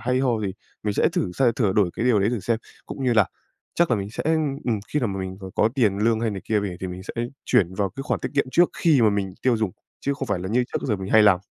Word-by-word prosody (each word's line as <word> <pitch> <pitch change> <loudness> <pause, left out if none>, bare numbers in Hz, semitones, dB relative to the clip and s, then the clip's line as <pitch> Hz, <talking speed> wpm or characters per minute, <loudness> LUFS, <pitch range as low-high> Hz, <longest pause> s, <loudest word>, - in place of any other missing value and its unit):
hay 125 +2 0
ho 125 -4 +1
gì. 100 -3 -2 0.3
Mình 105 -1 -1
sẽ - - +3
thử 165 - -2
xe 120 +3 +3
thửa 105 -6 +2
đổi 100 -4 +2
cái 115 - -2
điều 125 -4 +4
đấy 100 - +2
thử 120 -3 -2
xem, 110 +4 0 0.3
cũng 135 - -5
như 125 - +3
là 110 -4 +4 0.5
chắc 170 -1 +2
là 120 - +3
mình 100 +1 -4
sẽ, - - -4 0.4
ừm, 110 -4 0
khi 150 - 0
nào 120 - 0
mà 95 -1 -3
mình 95 0 -5
c - - -18
có 110 - +3
tiền 105 -7 +2
lương 110 +1 +2
hay 115 - 0
này 100 -2 -5
kia 105 -2 +1
về 95 -3 -4
thì 95 - -3
mình 90 +1 -7
sẽ 115 +4 -4 0.2
chuyển 95 -1 +2
vào 100 0 -1
cái 135 - -7
khoản 140 - -1
tiết - - -2
kiệm 140 - +3
trước 175 +5 +4
khi 150 -7 +4
mà 110 - +5
mình 95 -2 -2
tiêu 125 -3 +3
dùng, 110 -4 0 0.3
chứ 140 - 0
không 135 -1 -4
phải 100 - 0
là 95 +1 -5
như 125 +3 +2
trước - - -2
giờ 105 - +1
mình 95 0 -5
hay 110 -1 +7
làm. 95 -4 +5
110 Hz, 305 wpm, -24 LUFS, 95-125 Hz, 0.5 s, hay